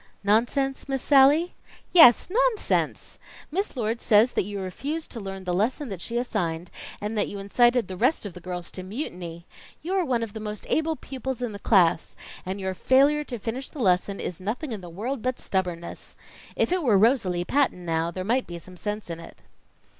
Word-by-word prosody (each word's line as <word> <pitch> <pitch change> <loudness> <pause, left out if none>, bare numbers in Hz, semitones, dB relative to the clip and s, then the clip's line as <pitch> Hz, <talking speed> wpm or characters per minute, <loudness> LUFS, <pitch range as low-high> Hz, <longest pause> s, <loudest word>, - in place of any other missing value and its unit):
"Nonsense, 255 +7 +1
Miss 270 -1 -1
Sallie?" 290 +5 +5 0.4
"Yes, 320 -10 +8
nonsense! - - 0 0.3
Miss 380 -3 -2
Lord 230 0 -1
says 220 +3 +5
that - - 0
you 205 0 -5
refused 285 - -4
to 235 - -5
learn 195 -2 -6
the 180 -1 -2
lesson 240 - 0
that 190 -4 -6
she 235 +5 -3
assigned, 170 -8 -2 0.3
and 210 +2 -4
that 210 - +1
you 205 - -6
incited 240 +3 +2
the 185 - -6
rest 245 - +1
of 200 - -6
the 180 - -10
girls 180 -1 -6
to 185 - -7
mutiny. 180 - -6 0.4
You 355 +4 -2
are 380 -2 +2
one 245 -6 0
of 220 -3 -6
the 220 - -6
most 210 0 -6
able 320 0 +1
pupils 260 -3 -5
in 240 - -2
the 200 - -8
class, 180 -6 +3 0.3
and 190 +2 -3
your 190 -1 -2
failure 280 +8 +3
to 245 - -5
finish 235 +5 -5
the - - -13
lesson 195 -3 +1
is 180 - -5
nothing 240 +9 -3
in 215 -4 -5
the 175 - -9
world 225 +9 -4
but 255 +1 -1
stubbornness. 180 -3 -3 0.4
If - - +1
it 365 0 +2
were 235 -9 +4
Rosalie 190 -6 +2
Patton 265 -10 +1
now, 165 0 0
there 185 +2 -5
might 245 +6 0
be 175 - -6
some 180 +2 -13
sense 210 +2 -4
in 165 -1 -6
it." 165 - -13
215 Hz, 200 wpm, -25 LUFS, 185-265 Hz, 0.4 s, Yes